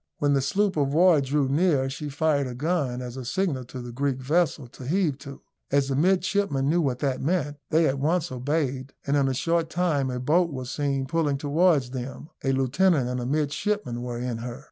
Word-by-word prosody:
When 145 -1 +2
the 135 - +3
sloop 195 +7 0
of 140 -1 +1
war 170 -3 +5
drew 140 +1 +1
near, 145 -1 +2
she 140 +2 -5
fired 145 -1 +1
a 125 - -6
gun 140 -4 -1
as 125 +1 -7
a 130 - -5
signal 135 -1 -1
to 125 +1 -8
the 120 - -7
Greek 135 +1 -1
vessel 150 +1 0
to 125 +1 -10
heave 160 -4 +1
to. 140 -2 -10 0.3
As 140 0 +2
the 135 - 0
midshipmen 180 -3 +1
knew 170 +4 +3
what 135 -5 0
that 135 -3 -1
meant, 150 -2 -1
they 160 +1 +3
at 135 0 -1
once 165 +3 0
obeyed, 135 0 -2
and 140 - +1
in 140 -2 +3
a 135 - 0
short 165 +4 0
time 160 -6 0
a 125 -1 -3
boat 170 +7 +2
was 130 -2 -5
seen 140 -2 -1
pulling 150 -1 0
towards 145 -2 +2
them; 130 +4 -6
a 135 - +1
lieutenant 135 +2 +2
and 125 0 -2
a 120 - -3
midshipman 145 - -1
were 120 -1 -4
in 120 -1 -3
her. 120 +2 -6
140 Hz, 210 wpm, -26 LUFS, 130-165 Hz, 0.3 s, war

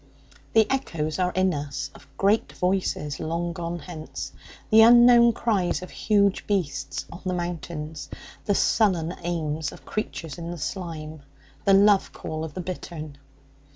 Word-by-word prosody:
The 220 -1 +6
echoes 165 - -2
are 180 -1 +2
in 185 -1 +2
us 145 -1 -4
of - - -16
great 205 +3 +2
voices 180 -6 -1
long 170 +2 -2
gone 170 -1 -4
hence, 160 -1 -7 0.4
the 220 +1 +8
unknown 240 +1 +8
cries 200 -7 0
of 185 - -9
huge 200 -2 +1
beasts 180 -9 -2
on 170 - -9
the 185 -1 -1
mountains; 165 -3 -5 0.4
the 205 - +2
sullen 180 -8 +2
aims 160 -3 -2
of - - -14
creatures 165 -7 -4
in 170 0 -5
the 175 - -5
slime; 160 -3 -5 0.4
the 195 - +6
love 200 0 +4
call 155 0 -5
of 160 -2 -7
the 185 - -3
bittern. 170 -4 -7
175 Hz, 150 wpm, -25 LUFS, 160-200 Hz, 0.4 s, the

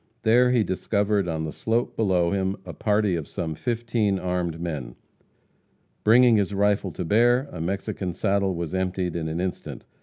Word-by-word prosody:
There 120 +3 +5
he 125 -3 +3
discovered 100 0 0
on 80 -2 -2
the 80 - -4
slope 115 +7 -1
below 90 -6 +1
him 95 0 -1
a - - -7
party 105 -3 +1
of 80 -4 -4
some 85 -4 -4
fifteen 115 0 -1
armed 90 -3 -2
men. 75 -8 -5 1.1
Bringing 120 +1 +6
his 100 -1 0
rifle 100 -1 +1
to 90 - -4
bear, 120 - +3
a 85 - -6
Mexican 95 0 -3
saddle 100 -2 0
was 85 -1 -4
emptied 95 -2 -1
in 80 -2 -2
an 80 +2 -3
instant. 95 0 -5
95 Hz, 170 wpm, -25 LUFS, 85-110 Hz, 1.1 s, Bringing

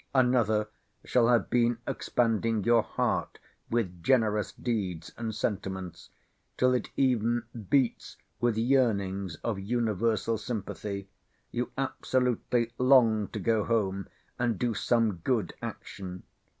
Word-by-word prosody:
Another 120 -5 +3 0.4
shall 120 -2 +3
have 120 -4 +2
been 120 -1 +3
expanding 115 -2 0
your 120 +2 +5
heart - - -1 0.3
with 95 -7 -1
generous 110 -3 +2
deeds 95 -9 -3
and 115 -2 -4
sentiments, 95 -4 -4 0.5
till 125 0 +4
it 125 - 0
even 120 -3 +2 0.3
beats 135 -4 +1 0.2
with 120 -2 +1
yearnings 100 - +1
of 110 -4 -1
universal 110 +1 0
sympathy; 100 -3 -4 0.4
you 120 +1 -2
absolutely 125 -3 0
long 120 -5 +5
to - - -7
go 110 +1 +1
home, 100 -5 0 0.3
and 120 -3 +1
do 120 +1 0
some 110 -2 +1
good 105 +1 -1
action. 90 -2 -7
115 Hz, 115 wpm, -29 LUFS, 100-120 Hz, 0.5 s, your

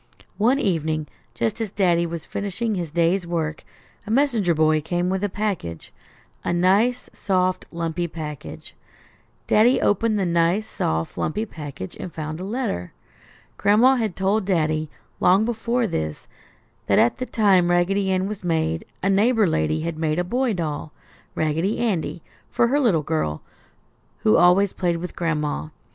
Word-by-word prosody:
One 240 +6 +4
evening, 160 - 0 0.3
just 115 - -1
as 220 - -2
Daddy 175 -4 +2
was 165 -1 -6
finishing 205 +3 -3
his 175 -5 -3
day's 170 +3 +1
work, 160 -2 -2 0.4
a - - -6
messenger 225 - +2
boy 155 0 +3
came 175 +3 -1
with 190 +1 -1
a 205 - +1
package; 185 - -4 0.5
a - - -1
nice, 195 +8 +2
soft 185 -2 0
lumpy 170 0 -2
package. 155 -3 -8 0.7
Daddy 235 +5 +4
opened 215 +2 +2
the 195 - 0
nice, 170 +4 +2
soft 80 - -2
lumpy 210 +8 -1
package 145 - -8
and 180 - -6
found 155 0 -5
a - - -5
letter. 200 - -3 0.7
Gran'ma 245 +6 +5
had 215 -6 -1
told 195 +3 +1
Daddy, 155 -5 0 0.3
long 190 +4 +4
before 235 +1 0
this, 80 - -3 0.6
that - - +3
at 120 - +3
the 255 - -3
time 190 -5 +3
Raggedy 190 +3 +2
Ann 185 0 +1
was 210 -2 -6
made, 160 -1 0 0.2
a - - +2
neighbor 215 +3 +3
lady 155 - 0
had 165 -1 -4
made 155 -1 0
a 180 - +1
boy 245 +5 0
doll, 155 -4 -3 0.4
Raggedy 160 +7 0
Andy, 185 -7 -1 0.3
for 235 - +2
her 285 +3 +2
little 200 - +2
girl, 110 - -2 0.8
who 105 - +5
always 185 +2 +5
played 175 -2 0
with 180 +2 -6
Gran'ma. 150 - -2
180 Hz, 155 wpm, -23 LUFS, 160-210 Hz, 0.8 s, Gran'ma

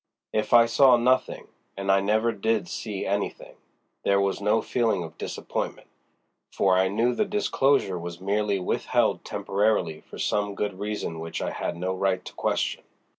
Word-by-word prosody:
If 110 0 -1
I 120 0 +8
saw 125 +2 +5
nothing—and 120 -5 -1
I 95 - +5
never 110 +4 +2
did 110 -2 0
see 100 +3 -4
anything—there 100 0 -3
was 100 +1 0
no 105 +2 +3
feeling 115 -8 0
of 80 0 -9
disappointment, - - -4 0.6
for 95 -1 +2
I 95 +1 +3
knew 115 +5 +1
the 215 - +1
disclosure 140 - +1
was 85 0 -7
merely 100 +1 0
withheld 90 - 0
temporarily 100 -5 0
for - - -12
some 105 -1 -1
good 100 -2 -3
reason 105 -5 -4
which 80 0 -5
I - - -2
had 85 - -4
no 90 +2 -2
right 95 -1 0
to - - -9
question. - - -1
100 Hz, 155 wpm, -26 LUFS, 95-110 Hz, 0.6 s, I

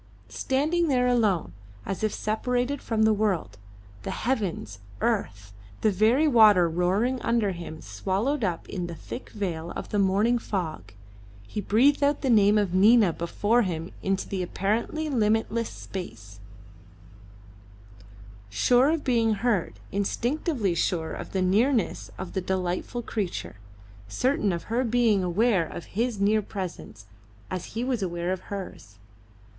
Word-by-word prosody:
Standing 310 +6 0
there 250 -4 +2
alone, 220 -8 +1 0.3
as 195 +2 -4
if 215 - +2
separated 250 +6 -1
from 220 -1 0
the 220 0 +5
world; 190 - -1 0.4
the - - -6
heavens, 195 - -2 0.2
earth; 105 - -2 0.3
the 215 - +3
very 225 - +3
water 215 - +6
roaring 190 +10 0
under 230 -4 +1
him 170 -3 -8
swallowed 195 - -2
up 175 -4 -2
in 180 -3 -4
the 170 - -6
thick 240 - -8
veil 175 -6 -4
of - - -6
the 205 - 0
morning 205 +5 +3
fog, 160 - -4 0.5
he 210 - -4
breathed 260 +9 +3
out 285 +1 +2
the 265 - +1
name 210 -1 +5
of 200 -4 0
Nina 205 -1 +5
before 205 +8 +1
him 170 -4 -3
into 195 0 -1
the 190 -2 -3
apparently 220 - -1
limitless 225 -2 +1
space, 110 - -8 2.1
sure 245 - +3
of 320 -1 0
being 230 -4 +2
heard, 210 -4 0 0.2
instinctively 235 - -1
sure 165 -1 -1
of - - -7
the 190 -1 0
nearness 220 +5 +1
of 190 - -7
the 190 - -1
delightful 185 +6 -2
creature; 200 - -4 0.5
certain 250 - +1
of 170 -1 -3
her 235 +3 -1
being 230 -5 +2
aware 185 -1 +2
of 170 - -8
his 230 +1 -1
near 210 +2 +3
presence 180 - -7 0.5
as 185 +3 -5
he 235 - 0
was 250 -3 -1
aware 175 -1 -2
of 190 - -4
hers. 185 - -7
205 Hz, 140 wpm, -26 LUFS, 180-240 Hz, 2.1 s, water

